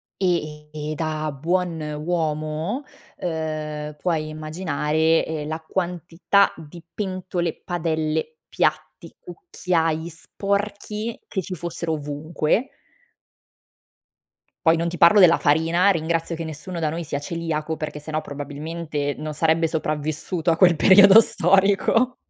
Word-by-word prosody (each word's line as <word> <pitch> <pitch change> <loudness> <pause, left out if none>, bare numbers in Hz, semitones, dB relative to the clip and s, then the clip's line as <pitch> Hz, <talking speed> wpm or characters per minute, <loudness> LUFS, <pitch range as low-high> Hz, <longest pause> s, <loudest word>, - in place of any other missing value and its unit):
E 155 -5 -2
e 155 0 -5
e - - -3
da 155 -1 -2
buon 170 +3 -1 0.2
uomo, 160 - -2 0.4
uhm, 155 -3 -4
puoi 155 -2 -1
immaginare, 155 0 0
ehm, 155 -2 -4
la 160 +1 -3
quantità 175 +3 +1
di 165 +1 -12
pentole, 185 -4 -3
padelle, 160 - -2
piatti, - - -2
cucchiai 170 - -2
sporchi 205 +5 -3
che 190 - -2
ci 185 +1 -6
fossero 170 -1 -4
ovunque. 155 - -1 2.0
Poi 165 +1 +6
non 170 +1 -1
ti 175 - -4
parlo 170 +6 +6
della 170 -3 +7
farina, 165 +6 +3
ringrazio 165 -1 -1
che 165 - -5
nessuno 160 +3 -6
da 160 -2 0
noi 165 +2 -3
sia 145 -2 -3
celiaco 160 -1 -3
perché 150 -1 -5
se 155 +1 -9
no 155 - 0
probabilmente 145 +1 -4
non 155 0 -5
sarebbe 160 +1 +2
sopravvissuto 155 +2 -1
a - - 0
quel 175 -2 +5
periodo 200 +4 +8
storico. 195 +6 +2
165 Hz, 125 wpm, -23 LUFS, 155-180 Hz, 2.0 s, periodo